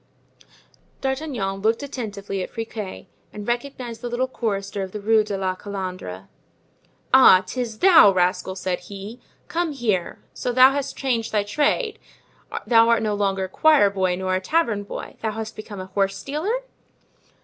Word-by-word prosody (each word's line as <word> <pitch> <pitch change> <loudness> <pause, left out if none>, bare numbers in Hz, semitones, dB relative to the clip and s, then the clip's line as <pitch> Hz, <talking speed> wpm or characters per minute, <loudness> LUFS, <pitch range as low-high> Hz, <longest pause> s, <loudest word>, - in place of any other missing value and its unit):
D'Artagnan 265 -8 -2
looked 225 +5 +1
attentively 205 -8 -5
at - - -4
Friquet 220 -5 -6 0.3
and 210 -1 -8
recognized 240 -1 -3
the 245 - -4
little 245 +2 0
chorister 200 -5 -3
of 190 -1 -5
the 210 - -4
Rue 220 +1 +3
de 205 -2 -4
la 190 -1 -1
Calandre. 185 - -6 0.9
"Ah! 220 -8 +8
'tis 235 +1 -4
thou, 345 - +7
rascal!" 185 0 0
said 185 -1 -2
he, 200 +5 -9 0.3
"come 335 -2 -1
here: 215 -10 -1 0.2
so 250 - -2
thou 255 +2 +7
hast 275 -1 -3
changed 240 -5 -1
thy 210 -2 +1
trade; 300 - 0 0.7
thou 230 -1 +5
art 230 -1 +3
no 215 -1 0
longer 195 -2 0
a - - -2
choir 295 - +4
boy 185 -2 0
nor 185 0 -2
a 185 - 0
tavern 230 - +1
boy; 205 - -8
thou 220 -1 -1
hast 220 0 -6
become 215 -2 -8
a 185 - -5
horse 195 +1 -1
stealer?" 355 - -2
215 Hz, 160 wpm, -23 LUFS, 195-255 Hz, 0.9 s, Ah